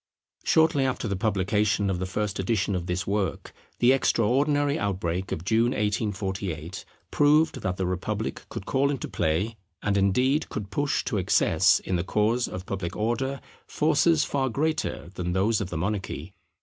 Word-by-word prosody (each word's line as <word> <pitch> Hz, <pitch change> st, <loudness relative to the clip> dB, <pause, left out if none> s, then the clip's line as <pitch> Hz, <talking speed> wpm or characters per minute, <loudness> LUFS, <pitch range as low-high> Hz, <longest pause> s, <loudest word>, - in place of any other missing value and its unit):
Shortly 160 Hz, -3 st, +3 dB
after 130 Hz, -3 st, -1 dB
the 100 Hz, -, -1 dB
publication 105 Hz, +1 st, +1 dB
of 95 Hz, -2 st, -1 dB
the 95 Hz, -, -2 dB
first 105 Hz, +1 st, -2 dB
edition 100 Hz, 0 st, 0 dB
of 90 Hz, -2 st, -3 dB
this 90 Hz, +1 st, -2 dB
work, 100 Hz, -1 st, -2 dB, 0.2 s
the 120 Hz, +1 st, +5 dB
extraordinary 140 Hz, +3 st, +2 dB
outbreak 95 Hz, -2 st, -2 dB
of 80 Hz, -, -4 dB
June, 115 Hz, +4 st, +2 dB
1848, 95 Hz, -4 st, -2 dB, 0.3 s
proved 150 Hz, +2 st, +3 dB
that 90 Hz, -2 st, -2 dB
the 95 Hz, -, -1 dB
republic 90 Hz, 0 st, -3 dB
could 95 Hz, -, -6 dB
call 140 Hz, +1 st, +1 dB
into 140 Hz, -3 st, -3 dB
play, 95 Hz, +9 st, -1 dB, 0.3 s
and, 100 Hz, -1 st, +1 dB
indeed, 125 Hz, +10 st, +2 dB
could 100 Hz, -2 st, -5 dB
push 145 Hz, 0 st, 0 dB
to 105 Hz, -, -2 dB
excess, 90 Hz, -, +4 dB
in 95 Hz, -, -2 dB
the 85 Hz, -, -1 dB
cause 110 Hz, +5 st, +1 dB
of 90 Hz, 0 st, -7 dB
public 95 Hz, -3 st, -4 dB
Order, 125 Hz, +5 st, -1 dB, 0.3 s
forces 155 Hz, 0 st, +3 dB
far 135 Hz, -2 st, 0 dB
greater 155 Hz, -, -2 dB
than 90 Hz, -1 st, -3 dB
those 105 Hz, +4 st, +2 dB
of 95 Hz, -, -3 dB
the 85 Hz, -, -4 dB
monarchy. 95 Hz, +1 st, -3 dB
105 Hz, 160 wpm, -26 LUFS, 95-130 Hz, 0.3 s, the